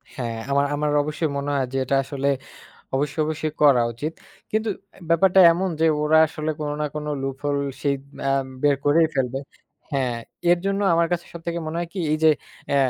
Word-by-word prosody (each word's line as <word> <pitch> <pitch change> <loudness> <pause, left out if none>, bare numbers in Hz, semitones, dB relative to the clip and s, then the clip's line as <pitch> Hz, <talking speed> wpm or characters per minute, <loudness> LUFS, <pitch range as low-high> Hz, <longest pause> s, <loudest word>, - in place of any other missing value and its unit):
হ্যাঁ, 120 -4 -4
আমার 140 +1 +3
আমার 150 +1 0
অবশ্যই 155 +2 -2
মনে 140 +1 -3
হয় 135 -2 +1
যে - - 0
এটা 135 +2 0
আসলে 140 0 -3 0.7
অবশ্যই, 145 +3 -1
অবশ্যই 155 0 -3
করা 140 -5 +6
উচিত। 150 +8 -4 0.4
কিন্তু 220 +1 0 0.2
অ্যা - - -18
ব্যাপারটা 190 +3 +4
এমন 185 +3 -1
যে 165 - +4 0.2
ওরা 155 +1 +4
আসলে 155 0 -4
কোন 150 - -2
না - - +1
কোন 150 0 -4 0.2
লুপহোল 135 +2 -2
রশিদ 140 0 -2 0.2
অ্যাম 135 -1 +1 0.2
বের 145 -1 +5
করেই 160 +3 +5
ফেলবে 135 0 0 0.5
হ্যাঁ 130 -3 0 0.3
এর 175 - +5
জন্য 195 +1 0
আমার 170 0 +3
কাছে 175 -1 -1
সবথেকে 170 0 -4
মনে 155 +1 -4
হয় 175 - -3
কি 195 - -4
এই 155 - +2
যে 160 - +7 0.4
আ - - +3
150 Hz, 190 wpm, -23 LUFS, 140-165 Hz, 0.7 s, যে